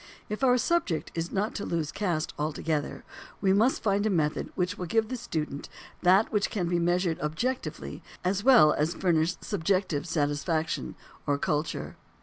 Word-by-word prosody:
If 210 +5 -4
our 250 -1 +5
subject 285 - 0
is 165 +1 -3
not 205 +2 -1
to 205 - -4
lose 160 -3 -2
caste 175 -7 -1
altogether 150 0 -2 0.4
we 190 -1 +3
must 225 +7 +2
find 200 -1 +2
a 215 - +2
method 155 -6 0
which 180 +1 0
will 180 - -5
give 220 +4 +1
the 255 - -2
student 155 - -4 0.3
that 190 +4 +4
which 210 -2 +1
can 180 -5 -1
be 175 0 +1
measured 175 0 +1
objectively, 230 - -3 0.2
as 190 +2 0
well 235 - +7
as 160 +3 0
furnish 170 -1 +2
subjective 185 -5 0
satisfaction 155 +1 -1 0.3
or 145 -1 +2
culture. 150 +2 -2
180 Hz, 160 wpm, -28 LUFS, 155-205 Hz, 0.4 s, well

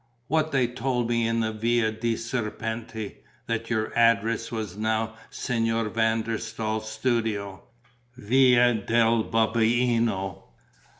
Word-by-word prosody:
"What 155 +1 +1
they 130 -3 +3
told 125 0 -2
me 115 -1 +1
in 115 0 0
the 110 0 0
Via 115 +1 +1
dei 115 +1 -1
Serpenti, 115 -1 -4 0.3
that 115 -1 -3
your 110 -2 -1
address 115 0 +2
was 110 -5 -4
now 110 +1 -1 0.2
Signor 115 -2 -1
van 110 0 +1
der 115 0 -2
Staal's 110 -1 -3
studio, 110 -4 -1 0.6
Via 125 +1 +4
del 115 +1 +2
Babuino." 115 -3 +1
115 Hz, 120 wpm, -26 LUFS, 110-120 Hz, 0.6 s, Via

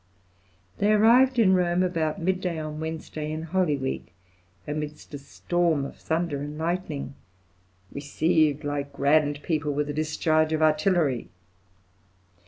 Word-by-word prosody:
They 205 +1 +3
arrived 245 +5 +5
in 205 -5 +5
Rome 180 0 +2
about 165 -4 -1
midday 180 -1 -1
on 155 -1 -5
Wednesday 155 -1 -5
in 155 +1 -4
Holy 165 -3 0
Week, 130 -9 -4 0.5
amidst 150 0 -5
a 145 - -5
storm 165 +1 -1
of - - -8
thunder 160 -3 -2
and 145 +1 -6
lightning, 160 -4 -3 0.8
"received 155 +1 +1
like 145 -1 -3
grand 145 +1 +2
people 150 -3 -1
with 145 +1 -1
a - - -6
discharge 155 +1 +1
of 155 - 0
artillery." 155 -4 +2
155 Hz, 130 wpm, -26 LUFS, 145-175 Hz, 0.8 s, arrived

